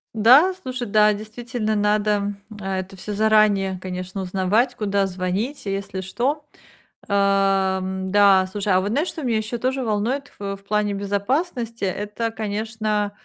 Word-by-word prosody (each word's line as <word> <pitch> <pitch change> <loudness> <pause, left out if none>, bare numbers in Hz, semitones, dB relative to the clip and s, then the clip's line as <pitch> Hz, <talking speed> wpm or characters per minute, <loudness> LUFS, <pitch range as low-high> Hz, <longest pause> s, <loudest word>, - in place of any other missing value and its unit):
Да, 260 - +6
слушай, 250 -2 -4
да, 210 0 +4
действительно 220 +1 -3
надо 210 0 +1 0.3
это 190 -1 -4
всё 210 +3 -5
заранее, 205 -3 +3
конечно, 185 +1 -5
узнавать, 195 +7 +1
куда 200 -3 0
звонить, 190 +8 -3
если 195 -1 -3
что. 265 +10 -2 0.6
Ам, 195 -1 +1
да, 200 -2 +5
слушай, 200 +1 -2
а 185 - +5
вот 200 +2 -2
знаешь, 295 +9 0
что 315 - -5
меня 235 -3 +1
еще 220 +2 -3
тоже 260 +2 -1
волнует 235 +6 -1
в 200 -1 -3
в 195 - -17
плане 205 0 0
безопасности 230 - -2
это, 210 +4 -2
конечно, 215 -1 -2
210 Hz, 140 wpm, -22 LUFS, 195-230 Hz, 0.6 s, Да